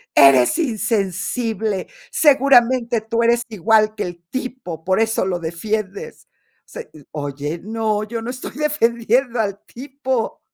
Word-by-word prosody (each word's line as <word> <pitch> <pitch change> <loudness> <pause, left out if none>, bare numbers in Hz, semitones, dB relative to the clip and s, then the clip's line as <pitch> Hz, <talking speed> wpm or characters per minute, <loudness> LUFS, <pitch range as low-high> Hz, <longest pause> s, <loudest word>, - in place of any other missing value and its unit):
"Eres 135 -3 +6
insensible, 220 - -1 0.2
seguramente 255 -4 +4
tú 230 +1 -1
eres 235 +1 +3
igual 215 +1 +2
que 210 - -2
el 175 -1 -7
tipo, 250 -11 -6
por 190 +3 +1
eso 225 -3 +1
lo 180 -2 -1
defiendes", 195 +4 -4 0.4
se 485 - -9
y, 155 - -14
oye, 145 +2 -4
no, 215 0 -1
yo 225 +2 -5
no 230 - -5
estoy 255 0 -7
defendiendo 245 -4 +1
al 200 -2 -2
tipo. 265 -2 -4
220 Hz, 130 wpm, -20 LUFS, 190-245 Hz, 0.4 s, Eres